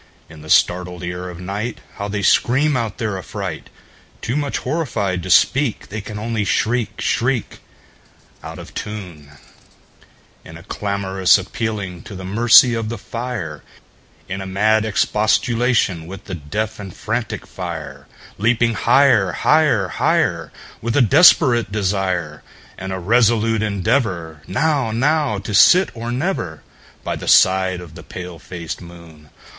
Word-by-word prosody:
In 80 - -13
the 80 - -12
startled 90 +1 +2
ear 90 +1 -5
of 90 - -9
nightHow 100 +2 -6
they 100 0 -3
scream 145 +9 +3
out 115 -4 -2
their 105 -4 -3
affright! 95 - -6 0.5
Too 120 - -3
much 145 -1 -1
horrified 105 - -2
to 95 - -7
speak, 130 - +2
They 105 +2 -5
can 105 +1 -8
only 110 0 -2
shriek, 110 +2 -1
shriek, 120 -1 -1 0.8
Out - - -8
of - - -11
tune, 90 -9 -8 1.1
In 80 - -11
a 85 - -14
clamorous 100 -2 +1
appealing 100 -2 -4
to 100 - -9
the 95 0 -7
mercy 115 +4 +6
of 115 -1 -2
the 115 - -4
fire, 110 - -5 0.7
In 95 +1 -4
a 95 - -6
mad 110 +3 +2
expostulation 110 -3 +1
with 95 +1 -9
the 95 - -7
deaf 105 +8 -4
and 100 -2 -7
frantic 115 +1 -3
fire, - - -7 0.3
Leaping 115 +2 +2
higher, 115 -5 +3
higher, 150 -11 +2
higher, - - 0 0.3
With 115 +2 -1
a 135 - +6
desperate 120 - +5
desire, 95 -6 -1 0.3
And 95 0 -6
a 95 - -3
resolute 115 +2 +2
endeavorNow—now 110 - 0
to 105 +2 -6
sit 180 - +6
or 115 +1 -5
never, 125 - -3 0.4
By - - -3
the - - -8
side 95 -1 +4
of 85 -3 -12
the - - -11
pale 90 -2 -9
faced 85 0 -7
moon. 85 -3 -14
105 Hz, 140 wpm, -19 LUFS, 90-115 Hz, 1.1 s, mercy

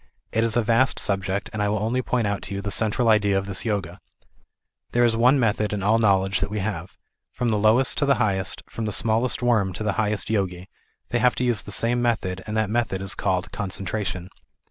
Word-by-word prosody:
It 110 - +1
is 115 0 0
a 120 - +2
vast 115 +4 +2
subject, 95 +1 -2
and 110 - -2
I 105 - +1
will 105 - 0
only 115 +5 -1
point 125 -2 -1
out 100 -1 -2
to 100 - -6
you 100 - -3
.the 105 - -3
central 115 +4 +1
idea 105 -3 +3
of 95 - -2
this 100 0 -4
Yoga. 100 -5 -3 0.9
There 120 0 +4
is 115 -1 +2
one 125 +4 +4
method 105 -3 0
in 100 -2 -3
all 110 +3 +3
knowledge 95 -3 +2
that - - -2
we 105 - -4
have. 95 -4 -4 0.3
From 125 - -2
the 105 -2 +1
lowest 110 +5 +3
to 145 - +1
the 140 - +4
highest, 95 -4 -1
from 115 - -5
the 105 - -2
smallest 115 +5 +2
worm 110 -6 +2
to 110 - -5
the 105 -2 0
highest 105 0 -1
Yogi, 95 -3 -2 0.4
they 120 - 0
have 125 0 +3
to - - -2
use 120 -4 +1
the - - -9
same 115 +4 +3
method, 105 -6 -1
and 105 +1 -3
that 110 -1 0
method 115 -5 -1
is 95 0 -1
called 95 -2 -2
concentration. 95 -2 -4
105 Hz, 230 wpm, -24 LUFS, 95-115 Hz, 0.9 s, There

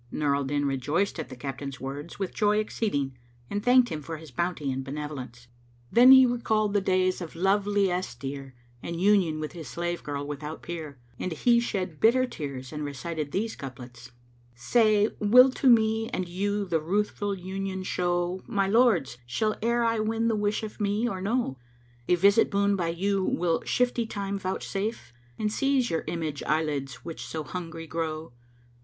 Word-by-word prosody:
Nur 145 -2 +1
al 140 -1 -1
Din 145 +1 0
rejoiced 145 +8 0
at 160 - -5
the 130 - -8
captain's 135 +1 -6
words 140 +4 -6
with 195 -2 -3
joy 210 -1 +2
exceeding 145 - -1 0.3
and 205 - -1
thanked 250 0 +5
him 155 -1 -4
for 160 +2 -6
his 155 -2 -12
bounty 155 0 -1
and 130 +1 -3
benevolence. 135 -4 -7 0.4
Then 250 +2 +8
he 260 -1 +9
recalled 220 -4 +1
the 205 - +3
days 185 -1 +1
of 170 -2 -7
love 195 +3 +2
liesse 190 -7 0
dear 135 0 -6 0.3
and 170 0 -5
union 185 -5 +3
with 155 -1 -4
his 165 -5 -8
slave 175 +7 -3
girl 145 -1 -4
without 150 +2 -6
peer, 160 -5 -6 0.2
and 185 - -3
he 235 +9 +3
shed 185 -9 -3
bitter 255 +3 +4
tears 140 - -6
and 150 0 -4
recited 145 +2 -4
these 220 +3 -2
couplets, 125 -2 -10 0.4
"Say, 215 - +3
will 250 +5 +7
to 265 0 +2
me 225 -1 +4
and 185 -1 -3
you 200 +3 -1
the 165 -4 0
Ruthful 205 +3 -1
union 190 +1 -4
show 175 0 -1
* - - -25
My 200 -4 +1
lords! 195 - +3
Shall 215 - 0
e'er 235 +1 +2
I 230 -1 +1
win 225 +1 0
the 225 - +1
wish 210 +1 0
of 215 0 -7
me 205 +3 +1
or 190 -5 -3
no? 205 - -1 0.5
A 180 - +4
visit 200 +5 +4
boon 200 0 +2
by 175 -3 -1
you 190 +3 0
will 170 -2 +1
shifty 245 -2 +1
Time 200 -2 -3
vouchsafe? 195 - -3
* 120 0 -31
And 210 0 -1
seize 270 -2 +1
your 165 - -1
image 160 -3 -3
eye 155 +1 +2
lids 140 -4 -4
which 165 -2 -6
so 160 -1 -5
hungry 165 -1 -6
grow? 160 -3 -4
180 Hz, 185 wpm, -27 LUFS, 150-210 Hz, 0.5 s, he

